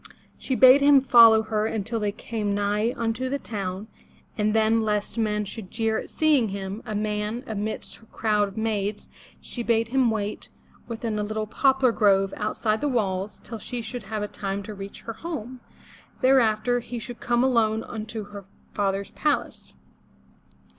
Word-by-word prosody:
She 260 - -2
bade 260 +2 +8
him 285 -1 +7
follow 230 -4 +7
her 215 0 -1
until 225 +1 -2
they 210 -1 0
came 210 -1 -3
nigh 205 +3 +1
unto 230 +3 -1
the 280 - -1
town, 200 -5 -5 0.5
and 210 0 0
then, 220 +1 +3
lest 210 -2 -1
men 210 -2 0
should 200 -1 -8
jeer 225 -1 0
at - - -8
seeing 295 -8 +2
him, 195 +2 -5
a 215 - -3
man, 210 +3 -2
amidst 215 -2 -4
her 225 - -21
crowd 210 -2 +1
of 195 - -12
maids, 210 -2 -2 0.3
she 240 - -5
bade 230 -1 +1
him 260 -1 +3
wait 210 -2 -3 0.4
within 225 -2 -3
a - - 0
little 215 +1 -3
poplar 265 +3 +3
grove 195 -3 +3
outside 215 0 -1
the 295 - +1
walls 195 -4 -1
till 225 - -7
she 240 +2 -5
should 245 +1 -5
have 210 0 -3
had 210 - -6
time 200 0 -3
to 215 - -7
reach 195 0 -9
her 230 - -6
home. 255 -3 -6 0.6
Thereafter 245 -2 +3
he 240 0 -7
should 235 +1 -7
come 240 0 +1
alone 225 -4 +2
unto 220 -1 -6
her 200 -2 -9 0.3
father's 195 -1 -1
palace. 300 -1 -2
220 Hz, 170 wpm, -25 LUFS, 210-235 Hz, 0.6 s, bade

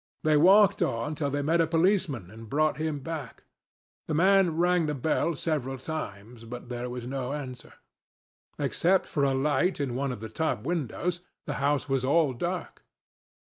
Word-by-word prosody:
They 155 -1 +4
walked 190 +6 +6
on 115 +6 0
till 145 -1 -2
they 145 +1 -1
met 165 +3 +3
a 165 - +2
policeman 165 - +1
and 115 0 -11
brought 155 +3 +1
him 155 -2 -2
back. 155 -5 -6 0.6
The 155 - -1
man 185 -1 +4
rang 175 -1 +3
the 150 - -1
bell 160 +4 0
several 135 -4 -2
times, 120 -6 -6
but 120 +1 -8
there 125 0 -4
was 125 -1 -6
no 130 +1 -3
answer. 130 -4 -7 0.8
Except 185 +2 +2
for 145 - -1
a 135 -1 +2
light 145 +6 +1
in 135 -4 -1
one 135 +2 -1
of 125 - -6
the 110 - -6
top 120 -1 -2
windows, 170 +3 -2 0.2
the 145 - -3
house 145 0 +1
was 135 -2 0
all 145 +1 +3
dark. 120 - -4
145 Hz, 170 wpm, -28 LUFS, 125-165 Hz, 0.8 s, walked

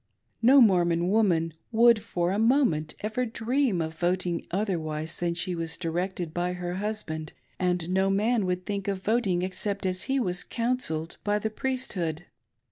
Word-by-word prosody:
No 260 +4 +7
Mormon 175 -5 +3
woman 175 -6 +2 0.2
would 235 0 +6
for 175 -2 -1
a 200 - 0
moment 225 - +2
ever 215 +4 -1
dream 235 -3 0
of 160 0 -5
voting 175 -1 0
otherwise 160 -5 -2
than 170 -1 -1
she 180 +2 -1
was 165 -1 -4
directed 175 -1 -3
by 180 +1 -1
her 180 0 -4
husband, 190 -7 -4 0.3
and 180 -2 0
no 190 +2 +2
man 210 +1 +1
would 180 0 -2
think 200 -1 -3
of 195 -1 -2
voting 200 -6 +1
except 195 +2 -3
as 185 0 0
he 270 0 +2
was 180 -6 +1
"counselled" 230 -10 -2
by 205 0 +1
the 220 +1 -2
Priesthood. 190 - -3
185 Hz, 160 wpm, -27 LUFS, 170-220 Hz, 0.3 s, No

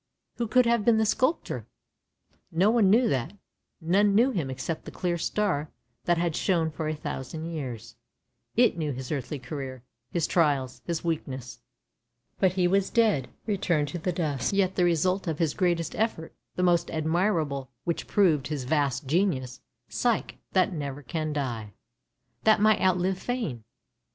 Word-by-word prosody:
Who 235 - -1
could 250 +3 +4
have 235 -2 +2
been 230 +1 +4
the 220 - +3
sculptor? 260 +8 0 0.8
No 185 +6 +3
one 225 -5 +4
knew 235 +4 +5
that 135 - -1 0.3
— - - -55
none 200 +5 +3
knew 245 +5 +5
him 165 - -2
except 130 +5 -4
the - - -6
clear 175 -1 -2
star 170 -4 -1 0.4
that 175 -1 +3
had 170 -2 0
shone 165 -4 +1
for 155 0 -4
a 155 - -1
thousand 150 +2 -5
years; 125 -9 -6 0.6
it 240 -4 +4
knew 150 -3 -1
his 130 0 -6
earthly 145 0 -3
career, 130 -1 -6 0.3
his 170 -3 0
trials, 140 -6 +1
his 170 -2 -2
weak 165 -2 -1
ness. 130 -3 -7 0.8
But 190 -2 +3
he 180 -1 +2
was 195 +1 +2
dead, 215 - +2 0.2
returned 175 -8 0
to 175 - -4
the 180 +3 -1
dust. 155 -6 -1
Yet 190 -1 +2
the 180 - +2
result 180 +3 +1
of 160 -2 -1
his 160 -3 +1
greatest 175 -3 0
effort, 215 -7 -2 0.2
the 180 - 0
most 175 -1 +3
admirable, 160 -4 0
which 170 - -2
proved 160 -10 +3
his 150 -4 -3
vast 140 -1 0
genius 135 -5 0 0.2
— 120 - -54
Psyche 235 - -1
— - - -53
that 185 0 +3
never 145 -2 -5
can 155 +4 -3
die; 120 -8 -3 0.7
that 220 -1 +5
might 215 0 +4
outlive 185 0 +2
fame. 190 - -3
165 Hz, 170 wpm, -27 LUFS, 145-195 Hz, 0.8 s, knew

